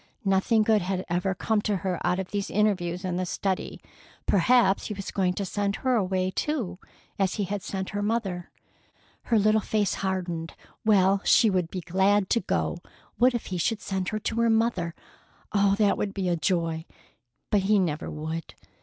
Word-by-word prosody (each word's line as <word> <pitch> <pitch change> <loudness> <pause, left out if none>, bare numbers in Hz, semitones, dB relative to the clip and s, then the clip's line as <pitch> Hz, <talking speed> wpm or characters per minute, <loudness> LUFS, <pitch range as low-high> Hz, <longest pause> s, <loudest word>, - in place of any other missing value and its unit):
Nothing 195 +3 +3
good 215 -1 +3
had 185 +1 -2
ever 180 +2 0
come 215 +2 0
to 210 -1 0
her 185 -1 -2
out 180 - +1
of 190 -1 -4
these 200 -1 -2
interviews 185 -3 0
in 180 -1 -1
the 185 - -1
study. 190 +1 -2 0.5
Perhaps 200 +1 +3
he 210 - -4
was 195 -1 -6
going 185 -2 +1
to 200 - -2
send 200 +1 -1
her 260 -1 0
away, 185 -3 0
too, 240 -9 -2 0.4
as 190 -1 +1
he 205 - -1
had 200 +1 -3
sent 190 0 -4
her 205 -1 -2
mother. 205 -5 -2 0.8
Her 230 - +2
little 215 +1 +3
face 210 -1 0
hardened. 180 -4 -3 0.3
Well, 195 -2 +4
she 225 -3 +5
would 180 -3 0
be 185 - -5
glad 190 +3 +2
to 235 - +4
go. - - -1 0.4
What 250 +1 +4
if 240 - -3
he 180 - -1
should 220 +5 0
send 190 -2 -2
her 215 - -2
to 220 +1 -3
her 230 - +3
mother! 220 -7 +1 0.6
Oh, 200 -1 +4
that 205 -1 +2
would 200 -1 -2
be 185 -3 0
joy!—but 165 - -3
he 205 +2 +3
never 170 -5 -1
would. 160 +1 -5
195 Hz, 180 wpm, -26 LUFS, 180-210 Hz, 0.8 s, she